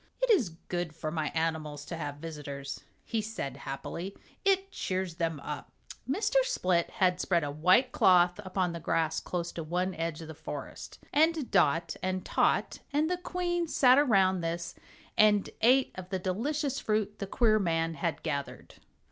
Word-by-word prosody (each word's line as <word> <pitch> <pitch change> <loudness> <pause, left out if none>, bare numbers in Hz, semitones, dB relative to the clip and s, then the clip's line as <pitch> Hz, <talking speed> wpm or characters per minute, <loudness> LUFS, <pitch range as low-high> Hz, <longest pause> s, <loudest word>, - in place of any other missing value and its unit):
"It - - +2
is 230 - +3
good 175 -3 -3
for 155 -1 -4
my 155 -2 -1
animals 155 -3 -2
to 170 - -5
have 145 -3 -4
visitors," 145 -3 -6 0.2
he 225 - -1
said, 210 - -5
happily, 140 +7 -6 0.3
"it 390 -1 +2
cheers 185 -3 -3
them 165 -3 -1
up." 150 0 -6 0.4
Mr. 410 - +1
Split 185 - +1
had 180 -1 +1
spread 170 -3 +2
a 145 - -2
white 185 - +4
cloth 180 -2 +4
upon 185 -2 -1
the 170 - -5
grass 160 0 0
close 175 -1 -3
to 170 - -5
one 180 +4 -1
edge 165 -2 -3
of - - -9
the 160 - -7
forest, - - -7 0.2
and 315 -2 +2
Dot 165 +3 +3
and 185 0 -2
Tot - - +1
and 305 +4 +1
the 360 - +1
Queen 350 -1 -2
sat 260 -3 +5
around 190 -9 +3
this 170 +1 -3 0.5
and 210 -2 +5
ate 255 +3 +5
of 185 0 -8
the 190 - -1
delicious 275 - -1
fruit 215 -1 -1
the 200 - -3
queer 215 +1 +3
man 165 -3 0
had 160 0 -3
gathered. 140 -3 -4
180 Hz, 170 wpm, -30 LUFS, 165-230 Hz, 0.5 s, sat